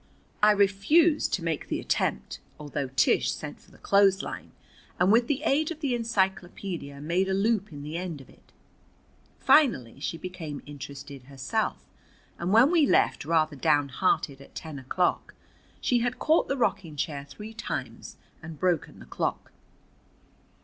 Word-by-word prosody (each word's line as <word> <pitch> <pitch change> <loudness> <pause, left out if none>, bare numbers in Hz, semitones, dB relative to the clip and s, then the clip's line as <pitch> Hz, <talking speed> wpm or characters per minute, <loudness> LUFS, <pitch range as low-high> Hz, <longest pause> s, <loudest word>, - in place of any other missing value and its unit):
I 210 - +7
refused 210 - +3
to 180 - -6
make 165 -3 -2
the - - -2
attempt, 70 +2 -1 0.2
although 145 -2 -4
Tish 125 - +2
sent 65 - -7
for - - -22
the - - -19
clothesline, 200 -1 +2 0.5
and 180 +2 +4
with 235 +2 +4
the 290 0 -1
aid 310 0 +2
of 335 -2 -6
the 280 -5 -1
encyclopædia 190 -9 -2
made 175 +6 0
a 190 - +1
loop 210 0 +1
in 145 -1 -8
the 155 +3 -5
end 175 -4 -5
of 135 - -14
it. - - -22 0.9
Finally 140 - +3
she 165 - -3
became 165 -5 -7
interested 140 -2 -9
herself, 140 - -3 0.5
and 175 +2 -1
when 235 +8 +6
we 325 -5 +4
left - - +2
rather 155 -1 +2
downhearted 145 0 +1
at - - -16
ten 155 -3 -7
o'clock 155 +8 -1 0.4
she 245 - +2
had 245 +1 -1
caught 315 +5 +2
the 275 - -1
rocking 195 - -1
chair 145 -1 -3
three 210 +10 -10
times 230 - -6 0.2
and 160 -2 -9
broken 180 -4 0
the - - -12
clock. 65 - -3
180 Hz, 155 wpm, -27 LUFS, 145-220 Hz, 0.9 s, I